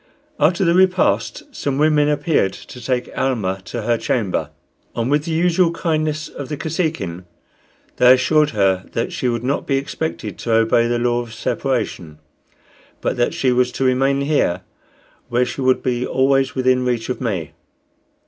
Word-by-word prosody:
After 175 Hz, +6 st, +3 dB
the 170 Hz, -, +3 dB
repast 185 Hz, 0 st, +2 dB
some 140 Hz, -2 st, -2 dB
women 150 Hz, 0 st, +3 dB
appeared 150 Hz, -, +1 dB
to 125 Hz, -, -11 dB
take 125 Hz, 0 st, -2 dB
Almah 100 Hz, -8 st, -1 dB
to 115 Hz, +2 st, -5 dB
her 115 Hz, 0 st, +1 dB
chamber, 95 Hz, -, -1 dB, 0.5 s
and, 115 Hz, +3 st, -1 dB
with 150 Hz, +1 st, +2 dB
the 165 Hz, -, -3 dB
usual 175 Hz, +2 st, +3 dB
kindness 155 Hz, -2 st, -1 dB
of 140 Hz, -, -8 dB
the 150 Hz, -, -3 dB
Kosekin, 150 Hz, -, -3 dB, 0.7 s
they 125 Hz, 0 st, +7 dB
assured 150 Hz, +3 st, +2 dB
her 95 Hz, -3 st, +1 dB
that 115 Hz, -, -2 dB
she 125 Hz, -, -1 dB
would 120 Hz, -1 st, -2 dB
not 135 Hz, +3 st, -1 dB
be 135 Hz, -, +2 dB
expected 135 Hz, -, -4 dB
to 115 Hz, -, -1 dB
obey 115 Hz, +1 st, +3 dB
the 120 Hz, 0 st, 0 dB
law 120 Hz, 0 st, +1 dB
of 115 Hz, -2 st, -9 dB
separation, 75 Hz, -6 st, -2 dB, 0.8 s
but -, -, -1 dB
that 120 Hz, -, 0 dB
she 130 Hz, -, +1 dB
was 125 Hz, 0 st, +2 dB
to -, -, -2 dB
remain 135 Hz, +2 st, +2 dB
here, 140 Hz, -, +1 dB, 0.7 s
where 120 Hz, +1 st, +2 dB
she 130 Hz, -, -5 dB
would 130 Hz, 0 st, +2 dB
be 125 Hz, -1 st, 0 dB
always 135 Hz, +1 st, +1 dB
within 130 Hz, -1 st, +2 dB
reach 120 Hz, -2 st, -1 dB
of 125 Hz, -, -3 dB
me. 95 Hz, -10 st, -2 dB
130 Hz, 165 wpm, -20 LUFS, 115-150 Hz, 0.8 s, they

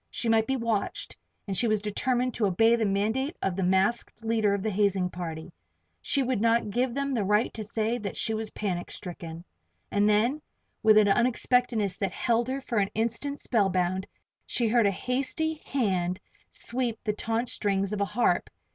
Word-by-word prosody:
She 235 Hz, -, -2 dB
might 220 Hz, 0 st, +3 dB
be 265 Hz, -, +1 dB
watched, 230 Hz, -5 st, -2 dB, 0.3 s
and 195 Hz, -, -3 dB
she 235 Hz, -, +2 dB
was 215 Hz, -1 st, +2 dB
determined 245 Hz, +4 st, 0 dB
to 215 Hz, -, +1 dB
obey 225 Hz, +5 st, +4 dB
the 225 Hz, -2 st, 0 dB
mandate 220 Hz, -, 0 dB
of 190 Hz, -2 st, -1 dB
the 195 Hz, -, -2 dB
masked 190 Hz, +5 st, +1 dB
leader 220 Hz, -3 st, +2 dB
of 195 Hz, -, -4 dB
the 220 Hz, -, 0 dB
hazing 195 Hz, -2 st, +1 dB
party. 165 Hz, -1 st, -6 dB, 0.5 s
She 275 Hz, -, +1 dB
would 255 Hz, -4 st, 0 dB
not 230 Hz, -2 st, +2 dB
give 245 Hz, +2 st, 0 dB
them 280 Hz, 0 st, -1 dB
the 225 Hz, -5 st, +1 dB
right 210 Hz, +4 st, +2 dB
to 220 Hz, -, -5 dB
say 225 Hz, +2 st, -1 dB
that 200 Hz, -3 st, -5 dB
she 225 Hz, -, 0 dB
was 220 Hz, 0 st, -2 dB
panic 185 Hz, -5 st, -3 dB
stricken. 170 Hz, -2 st, -8 dB, 0.5 s
And 205 Hz, +1 st, +3 dB
then, 235 Hz, +8 st, +2 dB, 0.4 s
with 215 Hz, -1 st, +6 dB
an 215 Hz, -1 st, +6 dB
unexpectedness 235 Hz, -2 st, +2 dB
that 195 Hz, -2 st, -2 dB
held 235 Hz, 0 st, +1 dB
her 270 Hz, +1 st, -2 dB
for 235 Hz, -4 st, -1 dB
an 195 Hz, -1 st, +1 dB
instant 235 Hz, +6 st, -2 dB
spellbound, 190 Hz, -4 st, +1 dB, 0.4 s
she 235 Hz, -3 st, +1 dB
heard 230 Hz, -2 st, +4 dB
a -, -, +3 dB
hasty 275 Hz, -, -1 dB
hand 185 Hz, -8 st, 0 dB, 0.3 s
sweep 240 Hz, -2 st, -2 dB
the 215 Hz, -3 st, 0 dB
taut 230 Hz, +3 st, -2 dB
strings 200 Hz, -2 st, 0 dB
of 205 Hz, -, -2 dB
a -, -, +3 dB
harp! 230 Hz, +4 st, +1 dB
220 Hz, 185 wpm, -27 LUFS, 195-240 Hz, 0.5 s, with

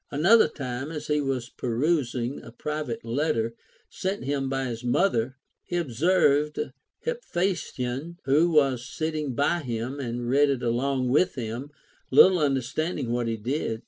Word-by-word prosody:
Another 185 Hz, +10 st, +5 dB
time, 130 Hz, -1 st, -5 dB
as 150 Hz, -2 st, -5 dB
he 150 Hz, 0 st, +1 dB
was 130 Hz, -3 st, -2 dB
perusing 125 Hz, -1 st, -1 dB
a 115 Hz, -, -11 dB
private 150 Hz, -2 st, -4 dB
letter 115 Hz, -2 st, 0 dB, 0.3 s
sent 190 Hz, +2 st, -3 dB
him 135 Hz, -1 st, -1 dB
by 135 Hz, 0 st, -1 dB
his 120 Hz, -1 st, -5 dB
mother, 130 Hz, -2 st, +1 dB, 0.3 s
he 175 Hz, -, -3 dB
ob 165 Hz, -7 st, -2 dB
served 150 Hz, +1 st, +3 dB, 0.5 s
Hephaestion, 170 Hz, -, -2 dB
who 150 Hz, +6 st, +4 dB
was 135 Hz, -6 st, +3 dB
sitting 155 Hz, -2 st, -3 dB
by 145 Hz, +6 st, +2 dB
him, 125 Hz, -1 st, -4 dB
to 120 Hz, -2 st, -3 dB
read 140 Hz, +4 st, +3 dB
it 135 Hz, -3 st, -1 dB
along 125 Hz, +2 st, 0 dB
with 150 Hz, +8 st, +3 dB
him, 120 Hz, +3 st, -4 dB, 0.4 s
little 180 Hz, +7 st, +7 dB
understanding 140 Hz, 0 st, -1 dB
what 120 Hz, -1 st, 0 dB
he 115 Hz, -1 st, -1 dB
did. 115 Hz, 0 st, -2 dB
135 Hz, 145 wpm, -26 LUFS, 120-155 Hz, 0.5 s, little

